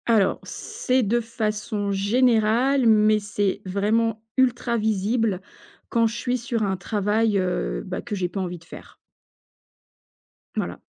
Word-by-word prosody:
Alors, 220 -5 +3
c'est 255 0 -1
de 230 +3 +2
façon 215 -3 -2
générale, 235 +5 +3
mais 215 -1 +5
c'est 205 -1 -1
vraiment 215 +3 0
ultra 245 -2 +2
visible 215 -1 0 0.5
quand 230 -1 +3
je 225 - -5
suis 250 +1 -1
sur 235 -1 -2
un 195 -2 0
travail, 210 +3 0
heu, - - -1
bah - - -4
que 210 - -5
j'ai 185 -2 -1
pas 195 - -5
envie 180 -1 -4
de 165 - -18
faire. 165 - -12 1.6
Voilà. - - -3
215 Hz, 140 wpm, -24 LUFS, 200-230 Hz, 1.6 s, mais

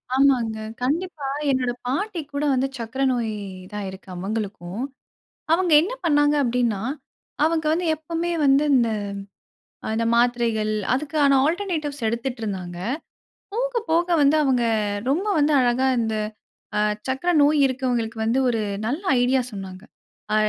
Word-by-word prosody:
ஆமாங்க. 255 -5 +3 0.2
கண்டிப்பா 300 +2 -2 0.2
என்னோட 255 -2 +1 0.2
பாட்டிக்குகூட 295 -2 -2
வந்து 260 +1 +1
சர்க்கரை 245 +4 -2
நோய் 235 -3 -1 0.4
தான் 210 -1 -4
இருக்கு, 190 +1 -11
அவங்களுக்கும். 195 0 -4 0.7
அவங்க 350 0 +2
என்ன 385 +9 -3
பண்ணாங்க 290 -2 +3
அப்டின்னா? 240 -5 0 0.6
அவங்க 320 0 +1
வந்து 345 +2 0
எப்பமே 330 +3 -3
வந்து 275 +2 +5
இந்த 235 -2 +3 1.0
அ - - -2
இந்த 230 - +1
மாத்திரைகள், 235 -3 +2 0.2
அதுக்கான 285 0 +2
ஆல்டர்நேட்டிவ்ஸ் 315 - -2
எடுத்துட்டு 235 +2 -3
இருந்தாங்க. 185 -5 -4 0.7
போக - - -1
போக 340 +2 +2
வந்து 285 +2 +5
அவங்க 260 -4 +2 0.5
ரொம்ப 345 +9 0
வந்து 295 +1 +3
அழகா 250 +1 +2
இந்த 225 -1 -1 0.6
அ - - +3 0.3
சர்க்கரை 270 +7 0
நோய் 295 +1 +4
இருக்கவங்களுக்கு 245 -3 -2
வந்து 235 +4 +2
ஒரு 225 -2 0 0.3
நல்ல 285 +9 -2 0.2
ஐடியா 255 +1 +3
சொன்னாங்க. 190 -2 -8 0.5
ஆ - - +4
265 Hz, 130 wpm, -23 LUFS, 230-305 Hz, 1.0 s, வந்து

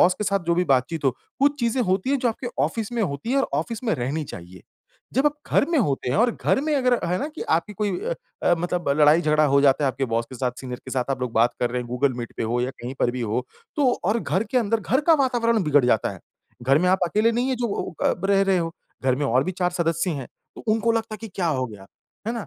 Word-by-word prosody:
Boss 180 - +5
के 210 - -4
साथ 200 0 +1
जो 170 - +3
भी 180 +1 +2
बातचीत 140 +2 +1
हो, 135 - +5 0.3
कुछ 285 +1 +3
चीज़ें 235 +2 +1
होती 190 +4 0
हैं 280 - +2
जो 245 - +1
आपके 235 +2 -4 0.2
ऑफ़िस 225 -1 -3
में 235 -2 0
होती 145 - -3
हैं 275 - +2
और 270 - +1
ऑफ़िस 225 +9 -4
में 220 - +1
रहनी 145 +4 -2
चाहिए। 90 -5 -10 0.5
जब 265 +4 +3
आप 295 - +2 0.2
घर - - +5
में 325 - +3
होते 140 - 0
हैं - - +1
और 240 +1 +4
घर - - +2
में 305 -1 0
अगर 255 -2 +3
है 180 - 0
ना 285 - -2
कि - - -5
आपकी 165 +5 0
कोई 205 +1 -1
अ - - -2 0.3
अ, 175 - +4
मतलब 175 -1 -2
लड़ाई-झगड़ा 155 0 +5
हो 140 0 +4
जाता 140 +1 +4
है - - +3
आपके 135 - -2
बॉस 115 -1 -1
के - - -8
साथ, 125 0 -1
सीनियर 125 -2 -6
के 130 - -6
साथ 130 0 -1
आप 135 - -1
लोग 125 -2 -3
बात 115 +2 +3
कर 120 - +1
रहे 125 +1 -1
हैं, 120 - -11
गूगल 125 +2 +1
मीट 120 - -6
पे - - -2
हो 115 +2 0
या 125 - -1
कहीं 125 +2 -5
पर 120 - +3
भी 125 +1 -5
हो, 120 +2 -2 0.3
तो 275 -4 +3
और 210 +6 +2
घर 195 0 0
के 255 - +4
अंदर 225 -1 0
घर 240 +9 +1
का - - +8
वातावरण 235 -4 +1
बिगड़ 145 -4 +4
जाता 115 -4 +2
है। - - -12 0.4
घर 135 +3 +4
में 180 +3 +2
आप 190 +1 +4
अकेले 215 +6 +2
नहीं 245 +3 0
है 260 - 0
जो 240 -1 -1
वो 200 - -4
अ, - - +4
ब - - -4
रह 195 0 +4
रहे 195 -2 +2
हो। 165 0 -3 0.3
घर 130 -1 +3
में 145 +1 -1
और 130 +2 +2
भी 185 - -2
चार 180 0 0
सदस्य 170 +1 0
हैं। 140 -6 -5 0.3
उ - - -9
उनको 225 +1 +2
लगता 225 -1 -2
है 215 - -9
कि 225 - -7
क्या 180 -3 -1
हो 130 -5 0
गया, 105 -4 -12 0.4
है 230 - 0
ना? 230 - -5
175 Hz, 285 wpm, -24 LUFS, -, 0.5 s, का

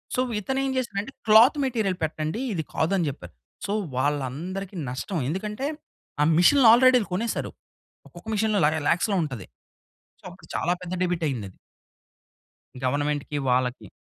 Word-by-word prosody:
So, - - -1 0.2
ఇతను 265 +6 -2
ఏం 270 - -1
చేసాడంటే, 235 -1 -3
"cloth 225 +7 +7
material 220 -8 -1
పెట్టండి 155 +6 -2
ఇది 165 -4 -2
కాదు" 160 - 0
అని 175 - +1
జెప్పారు. 140 - -9 0.3
సో, 200 - -1 0.2
వాళ్ళందరికి 150 +8 -2
నష్టం. 145 +8 -3
ఎందుకంటే, 210 - -3 0.5
ఆ - - +5
మిషన్‌లు 240 +9 +6
ఆల్రెడీ 255 +1 +6
ఇవి - - -6
కొనేసారు. 225 +5 -2 0.6
ఒక్కొక్క 175 +4 -15
మిషన్‌లో 210 -1 +1
ల 150 - +5 0.2
ల్యాక్స్‌లో 195 +3 +1
ఉంటది. 125 -10 -6 0.7
సో, - - -32
అప్పుడు - - -17
చాలా 175 - +1
పెద్ద 180 0 -5
డెబిట్ 175 -2 -1
అయిందది. 105 -8 -5 1.3
గవర్నమెంట్‌కి, 145 +2 -1
వాళ్ళకి. 125 -3 0
180 Hz, 140 wpm, -25 LUFS, 145-215 Hz, 1.3 s, cloth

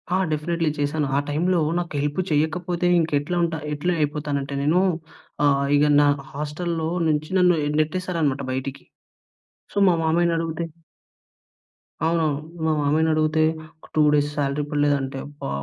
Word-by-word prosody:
ఆ! - - +3
డెఫినైట్లీ 165 +2 0
చేశాను. 145 0 0
ఆ - - +4
టైమ్‌లో 170 +4 +1 0.2
నాకు 170 -2 -5
హెల్ప్ 145 +3 -2
చేయకపోతే 170 +4 0
ఇంకా 160 -2 -1
ఎట్లా 150 +5 -3
ఉంట 170 -1 0 0.2
ఎట్లా 160 +5 0
అయిపోతానంటే 145 -2 -2
నేను 160 +5 +3 0.7
ఆహ్, 140 -1 +3
ఇగ 145 - +4 0.2
నా 145 - +4 0.2
హాస్టల్‌లో 160 +3 -3 0.2
నుంచి 155 0 0
నన్ను 180 -1 +5 0.3
నెట్టేసారన్నమాట 155 -4 -1
బయటికి 135 +1 -5 0.9
సో, - - -1
మా 180 - +5
మామయ్యని 170 +1 +2
అడిగితే 165 0 -3 1.4
అవునవును. 160 -3 +1 0.3
మా 160 - +2
మామయ్యనడిగితే 155 +1 +2 0.5
2 155 - +4
డేస్ 145 0 +2
సాలరీ 140 +1 0
పడలేదంటే 145 -2 0
అబ్బా! 145 - -7
155 Hz, 130 wpm, -23 LUFS, 145-170 Hz, 1.4 s, నన్ను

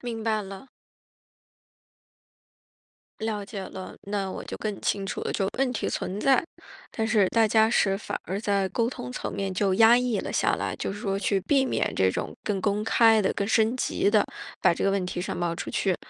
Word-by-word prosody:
明 230 -2 -5
白 220 -1 +1
了。 195 +5 -9 2.5
了 215 -2 -2
解 200 0 -7
了， 185 0 -8
那 200 -1 -3
我 - - -6
就 - - -6
更 210 -2 -4
清 200 -1 -1
楚 195 - -4
了， - - -2
就 195 - 0
问 265 -2 +1
题 240 - -2
存 195 +3 -3
在， 270 -2 +4 0.5
但 220 -1 -1
是 215 -3 +3
大 225 -1 +3
家 220 +1 +4
是 195 -4 +2
反 - - -4
而 195 +2 -3
在 200 -3 +1
沟 230 +5 0
通 125 - -6
层 - - -4
面 195 -1 -3
就 190 0 +1
压 225 +4 +7
抑 245 -4 0
了 - - -5
下 - - +2
来， - - -3
就 - - -3
是 205 - -8
说 195 -2 -1
去 200 -1 +1
避 270 +8 +2
免 - - -1
这 95 -1 +3
种 - - -4
更 200 -3 -1
公 205 +2 0
开 225 -1 +5
地、 190 - +1
更 200 - -2
升 225 +2 +2
级 250 - 0
地 210 -1 +4 0.4
把 - - +5
这 - - -2
个 195 - +3
问 195 -2 0
题 180 0 -4
上 180 - -4
报 175 -1 0
出 - - -5
去， 190 -3 0
205 Hz, 225 characters per minute, -26 LUFS, 195-225 Hz, 2.5 s, 压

